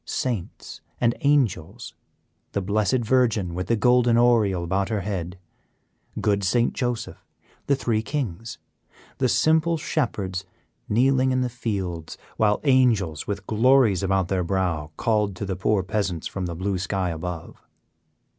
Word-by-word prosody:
Saints 115 -9 -4 0.2
and 120 -1 +2
Angels, 125 - 0 0.6
the 100 - 0
Blessed 105 +5 +1
Virgin 110 -8 +2
with 90 +1 -4
the 115 - +2
golden 125 0 +3
oriole 110 -7 +3
about 95 +3 -1
her 110 -3 -1
head, 90 -3 -4 0.8
good 100 -1 +1
St. 115 +6 +2
Joseph, 120 -3 -3 0.4
the 140 - +3
three 115 -4 0
Kings; 115 - -4 0.6
the 130 - +2
simple 160 +7 +3
Shepherds 100 - -2 0.5
kneeling 130 +4 +3
in 130 0 +1
the 125 - 0
fields, 95 -9 -4 0.2
while 105 -1 +2
Angels 115 - +2
with 100 -1 -4
glories 115 -3 +3
about 95 -2 +1
their 95 -1 0
brow 85 -4 -1
called 105 -4 +1
to 100 - -5
the 95 -1 -3
poor 95 +1 +1
Peasants 95 -5 -2
from 95 -2 -4
the 85 - -5
blue 95 +2 -2
sky 95 -2 -1
above. 85 0 -6
105 Hz, 140 wpm, -24 LUFS, 95-120 Hz, 0.8 s, golden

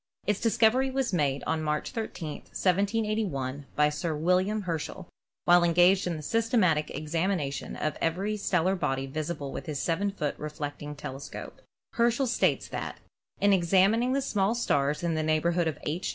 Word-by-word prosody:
Its 205 0 +1
discovery 230 +3 +3
was 265 -4 -1
made 140 -5 +1
on 160 -1 0
March 150 -1 -1
13, 220 -9 -4
1781, 195 - -1
by 150 0 +4
Sir 155 +2 -2
William 185 +6 +1
Herschel 165 -4 -4 0.4
while 175 0 +6
engaged 180 +3 +4
in 170 -2 -2
the 155 - -8
systematic 215 - +2
exami 165 +5 -1
nation 140 -3 -4
of 155 - -2
every 190 +6 0
stellar 190 -2 +1
body 135 -6 -1
visible 150 0 -4
with - - -6
his 150 -3 -3
7 185 +4 0
foot 155 -7 -2
reflect 150 -1 -5
ing 150 0 -6
telescope. 135 -1 -8 0.3
Herschel 240 +3 +2
states 240 - +1
that: - - -5 0.4
"In 200 0 +4
examining 195 +7 +3
the 275 0 +1
small 205 -3 +1
stars 145 -9 0
in 170 -1 +1
the 155 - 0
neighborhood 165 +2 +1
of 155 - -2
'H. 165 +5 -2
175 Hz, 165 wpm, -28 LUFS, 150-205 Hz, 0.4 s, while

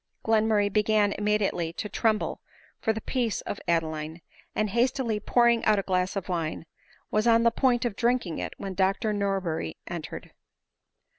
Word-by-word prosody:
Glenmurray 215 -2 +2
began 210 -1 +3
immediately 205 -5 0
to 210 - -4
tremble 215 0 0 0.4
tor 220 - +2
the 220 0 -4
peace 240 -3 -1
of 200 - -5
Adeline; 160 -1 -1 0.3
and 215 -2 0
hastily 235 -1 +1
pouring 235 +2 +3
out 215 - +4
a 195 - 0
glass 185 0 0
of 195 - -3
wine, 165 -3 -2 0.5
was 215 +2 +2
on 230 0 +5
the 235 - +5
point 245 0 +2
of 230 -4 -1
drinking 235 -7 0
it - - -4
when 195 -1 -5
Dr 195 +3 +1
Norberry 190 - -2
entered. - - -7
210 Hz, 155 wpm, -27 LUFS, 185-225 Hz, 0.5 s, on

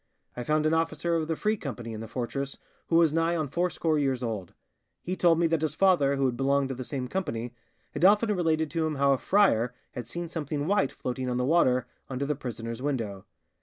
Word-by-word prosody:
I 125 - -4
found 155 +3 +1
an 155 - +3
officer 165 +1 0
of 160 -2 0
the 160 - -1
Free 215 +6 +1
Company 120 - -6
in 110 - -6
the 115 - -6
fortress 130 +4 -4 0.3
who 165 - +1
was 165 -2 +5
nigh 165 +1 +2
on 155 -3 -1
fourscore 165 -1 0
years 135 -3 0
old; 105 -7 -4 0.5
he 185 - -2
told 170 -3 +4
me 170 - +2
that 165 -1 +1
his 155 -1 -1
father, 170 -8 +4
who 135 0 +1
had 125 -2 +1
belonged 135 +1 +1
to - - -2
the 130 0 -5
same 130 0 -4
Company, 120 -9 -3 0.4
had 150 +1 -4
often 210 +2 +5
related 160 -3 +1
to 165 -2 0
him 155 - -2
how 140 0 +3
a 135 - -1
friar 125 - +3 0.2
had 120 -2 -6
seen 170 +7 -4
something 150 -3 -3
white 190 -6 +2
floating 125 0 -4
on 125 - -1
the 125 - +1
water 130 -5 +3 0.2
under 135 +1 -2
the 150 - 0
prisoner's 115 -3 -6
window. 115 -9 -3
145 Hz, 225 wpm, -28 LUFS, 125-165 Hz, 0.5 s, was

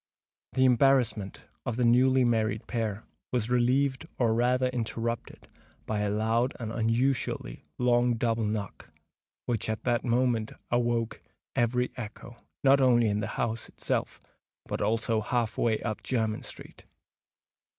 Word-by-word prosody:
The 130 - +3
embarrassment 125 -6 +2 0.2
of 120 - -2
the 125 0 +1
newly 130 +2 +5
married 110 -3 +1
pair 110 -3 -3 0.3
was 120 -2 -1
relieved, 130 +4 +2
or 115 -3 +2
rather 125 +2 +2
interrupted, 115 -1 -4 0.4
by 110 -1 -2
a 105 0 0
loud 110 +4 +1
and 110 -2 -4
unusually 115 - -1
long 120 0 +3
double 115 0 0
knock, 105 -2 -4 0.6
which 115 -3 -1
at 110 - -3
that 120 -2 +1
moment 120 -2 +1 0.2
awoke 120 -2 0 0.3
every 125 +1 +1
echo, 120 +1 -8 0.3
not 140 0 +5
only 120 -3 +4
in 105 0 0
the 105 - -2
house 115 -1 -2
itself, - - -2 0.5
but - - -4
also 110 +1 +1
half 115 0 -1
way 110 -2 +1
up 110 -2 -3
Jermyn 110 -4 -1
Street. - - -10
120 Hz, 135 wpm, -28 LUFS, 110-125 Hz, 0.6 s, newly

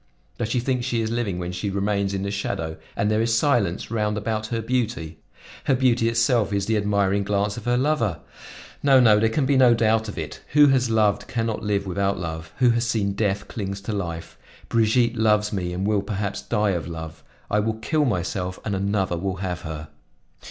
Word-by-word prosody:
Does 115 -2 -1
she 125 - +1
think 125 0 -1
she 120 -2 0
is 110 0 -2
living 115 -6 -1
when 90 0 -4
she 90 +3 -3
remains 100 0 0
in 95 - -2
the 100 - -2
shadow 80 -5 -3 0.2
and 105 +1 +1
there 110 +1 +2
is 115 0 +2
silence 115 - +1
round 105 -2 0
about 110 0 -2
her 115 0 -2
beauty? 115 -9 -2 0.5
Her 135 - +3
beauty 120 -3 +2
itself 115 -2 +2
is 100 -1 0
the 110 - +1
admiring 100 -1 +1
glance 100 0 0
of 115 - -8
her 120 0 +2
lover. 125 - +1 0.6
No, 135 -2 +6
no, 110 -4 +6
there 110 +1 +3
can 135 +5 0
be 135 0 +3
no 125 -2 +6
doubt 110 -1 +2
of 105 - -8
it; 80 -2 -6
who 145 -1 +7
has 130 -3 +2
loved, 110 -3 +2
can 115 -2 -1
not 115 -2 -2
live 100 -1 -1
without 100 +1 0
love; 80 -2 -5
who 125 -2 +4
has 115 0 0
seen 105 -4 0
death, 100 -1 -1
clings 100 -2 -4
to 105 +2 -4
life. 85 -5 -5 0.3
Brigitte 115 +1 +2
loves 105 -1 +2
me 90 -3 -2
and 90 +2 -2
will 105 -1 +2
perhaps 100 0 -3
die 105 -3 0
of 85 -3 -2
love; 80 -1 -7 0.3
I 105 - +3
will 110 +1 0
kill 145 +8 0
myself 90 -4 -2
and 105 - -1
another 95 -2 0
will 95 +1 -2
have 90 -2 -4
her." 80 -2 -7
105 Hz, 210 wpm, -24 LUFS, 95-115 Hz, 0.6 s, who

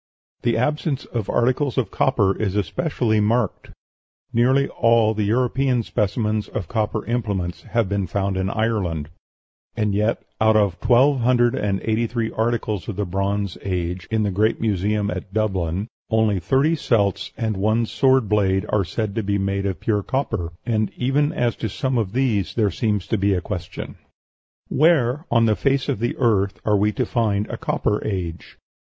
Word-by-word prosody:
The 115 -1 +1
absence 150 +2 -1
of 115 -5 -4
articles 130 +3 +1
of 130 - 0
copper 105 -8 +2
is 100 -3 -2
especially 110 - 0
marked, 110 0 0 0.6
nearly 130 +4 +3
all 115 -2 +3
the 105 -1 -1
European 125 +2 +1
specimens 105 +1 -1
of 95 -6 -5
copper 110 -1 -1
implements 100 -7 -2
have 115 -4 -1
been 100 -1 -1
found 100 +1 -1
in 95 0 -1
Ireland; 100 -9 -1 0.7
and 105 -1 +1
yet 105 +3 0 0.2
out 110 0 +5
of 100 -4 +2
twelve 130 +3 +4
hundred 120 0 +3
and 100 -2 -1
eighty 115 +1 0
three 115 -1 -2
articles 110 -3 -1
of 110 - -4
the 105 +1 -1
Bronze 100 +1 -2
Age, 90 -1 -3
in 110 -1 +1
the 100 - 0
great 105 +4 +1
museum 105 -1 0
at 95 +2 -6
Dublin, 95 -3 -1 0.2
only 110 -3 +2
thirty 135 - +2
celts 100 - 0
and 110 -2 -1
one 110 +4 +1
sword 130 0 +2
blade 95 -2 +2
are 105 -2 +2
said 100 +3 -3
to 115 - -1
be 100 -1 0
made 100 0 -1
of 95 - -3
pure 105 -2 +1
copper; 110 -8 -2
and 110 -2 0
even 145 +4 +1
as 120 -7 0
to 110 - -3
some 130 +4 -1
of 105 -3 -2
these 120 -8 0
there 105 -4 +2
seems 105 -4 -1
to 110 - -1
be 100 0 +2
a - - +1
question. 85 -2 -6 0.7
Where 150 -2 +2
on 115 -1 +4
the 110 -1 +3
face 135 +2 +1
of 140 -7 -1
the 120 +2 -1
earth 100 -6 +1
are 105 - +3
we 105 +1 +2
to - - -1
find 105 -4 0
a - - -4
Copper 105 - -1
Age? 90 -5 -4
110 Hz, 175 wpm, -22 LUFS, 100-120 Hz, 0.7 s, out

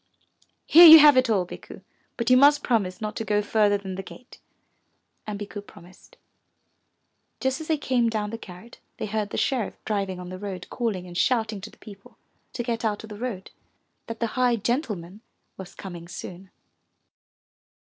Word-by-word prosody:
"Here 340 +2 +9
you 320 0 +12
have 295 -2 +7
it 255 -1 +3
all, 195 -5 +1
Bikku, - - -12 0.3
but 235 +1 -1
you - - +7
must 285 +2 +5
promise 210 -4 -1
not 215 -1 -4
to - - -3
go 210 -1 0
further 205 -1 +2
than 195 -1 -7
the 190 - -5
gate." 250 +6 -14 0.9
And 210 -1 -4
Bikku 205 0 -7
promised. 185 -2 -18 1.2
Just 265 +3 -2
as 315 - -8
they 315 - +1
came 250 -4 0
down 215 -2 -3
from - - -9
the 230 - -5
garret 195 +4 -13 0.2
they - - -4
heard 210 0 -3
the - - -5
sheriff 250 -6 -1
driving 195 -4 -2
on 180 0 -8
the 185 0 -8
road 190 -3 -6
calling 220 -7 -3
and 175 -1 -11
shouting 220 -1 0
to 220 - -8
the - - -21
people 200 -2 -15 0.4
to 240 - -4
get 235 -1 -3
out 215 -2 -2
of 220 - -11
the 210 - -9
road, 225 -6 -6 0.6
that 230 -1 -7
the 235 - 0
high 250 -2 +2
gentleman 210 - -3 0.3
was 190 -2 -11
coming 175 -3 -9
soon. 180 +2 -9
215 Hz, 185 wpm, -25 LUFS, 190-240 Hz, 1.2 s, you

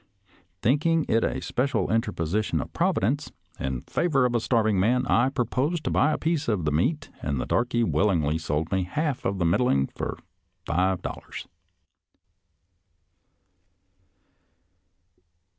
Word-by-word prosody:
Thinking 155 +6 +2
it 115 +1 +2
a - - -1
special 125 -6 0
interposition 105 -3 0
of - - -6
Providence 140 +9 0 0.3
in 65 -2 -3
favor 140 -7 +1
of 125 - 0
a 120 - +2
starving 110 -4 +2
man, 125 +6 +2
I 120 +2 +3
pro 135 -3 -1
posed 150 +8 -1
to - - -1
buy 150 +4 +3
a - - 0
piece 160 -2 -1
of 105 -8 0
the 75 - +1
meat, 145 - 0
and 70 -3 -2
the - - -2
darky 120 0 +1
willingly 80 -9 +1
sold 80 0 -2
me 95 - +1
the - - -14
half 150 - -2
of 100 - 0
the 85 - 0
middling 85 - +3
for - - -5 0.5
five 95 0 0
dollars." - - -7
115 Hz, 140 wpm, -26 LUFS, 90-135 Hz, 0.5 s, I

